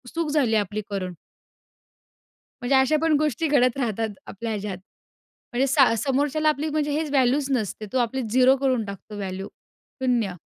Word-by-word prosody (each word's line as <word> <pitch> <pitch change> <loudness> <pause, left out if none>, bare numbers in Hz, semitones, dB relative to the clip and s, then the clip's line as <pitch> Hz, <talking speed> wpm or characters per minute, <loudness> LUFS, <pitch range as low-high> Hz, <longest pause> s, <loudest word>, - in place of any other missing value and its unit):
चूक 330 -2 -1
झाली 265 -7 +2
आपली 210 0 -1
करून. 185 -2 -3 1.5
म्हणजे 245 +3 +2
अशा 265 +4 +4
पण 325 -1 +2
गोष्टी 305 +1 0
घडत 255 -4 +3
राहतात 225 -4 -1 0.2
आपल्या 225 +3 -5
ह्याच्यात. 205 -3 -4 0.8
म्हणजे 260 +3 +2
सा 270 -3 +5
समोरच्याला 285 +5 +1
आपली 305 +1 -1
म्हणजे 300 -1 -1
हेच 305 +1 -1
व्हॅल्यूच 270 +1 +3
नसते. 220 -4 -2
तो - - +2
आपली 250 +2 0
0 255 +3 +4
करून 255 -4 0
टाकतो 200 +1 -9
व्हॅल्यू 195 0 -5 0.6
0. 235 -7 +1
255 Hz, 155 wpm, -24 LUFS, 215-285 Hz, 1.5 s, सा